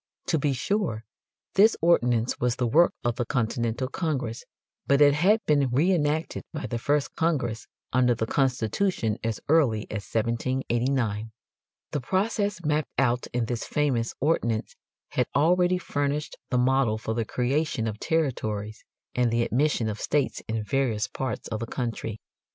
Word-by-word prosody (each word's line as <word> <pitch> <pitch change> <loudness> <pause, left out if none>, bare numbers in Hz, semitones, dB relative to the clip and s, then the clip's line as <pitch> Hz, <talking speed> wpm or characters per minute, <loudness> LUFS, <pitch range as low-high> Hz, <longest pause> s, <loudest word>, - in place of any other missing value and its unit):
To 160 - +2
be 145 0 +1
sure, 130 - -1 0.5
this 215 +3 +5
ordinance 125 -8 +2
was 120 -1 +1
the 125 - -1
work 160 +9 +5
of 120 -1 0
the 120 - +1
Continental 120 +1 -1
Congress, 135 -7 -3 0.4
but 140 0 +4
it 145 -1 +7
had 195 +9 +3
been 145 -3 +3
re 145 +10 +3
enacted 155 -1 0
by 155 -1 -5
the 120 - -3
first 145 +3 0
Congress 130 -9 -1 0.3
under 125 -1 +4
the 110 - -1
Constitution 125 - 0
as 115 -1 -2
early 135 -9 +3
as 105 -2 -5
1789. 115 -1 0 0.6
The 145 - -2
process 200 - -1
mapped 150 0 +1
out 125 -2 +1
in 120 -1 -1
this 120 0 -3
famous 130 -6 0
ordinance 120 -7 0 0.3
had - - 0
already 180 +5 +3
furnished 145 -2 -2
the 125 - +1
model 125 -3 +2
for 110 0 -3
the 115 0 0
creation 125 +1 -1
of 110 -1 -4
territories 110 -9 -2 0.3
and 125 -1 +2
the 115 +1 +1
admission 125 -2 +1
of 105 -1 -4
states 145 -3 0
in 110 -1 -2
various 115 -2 0
parts 130 -1 -4
of 110 - -3
the 115 - -4
country. 115 -3 -4
130 Hz, 155 wpm, -26 LUFS, 115-150 Hz, 0.6 s, it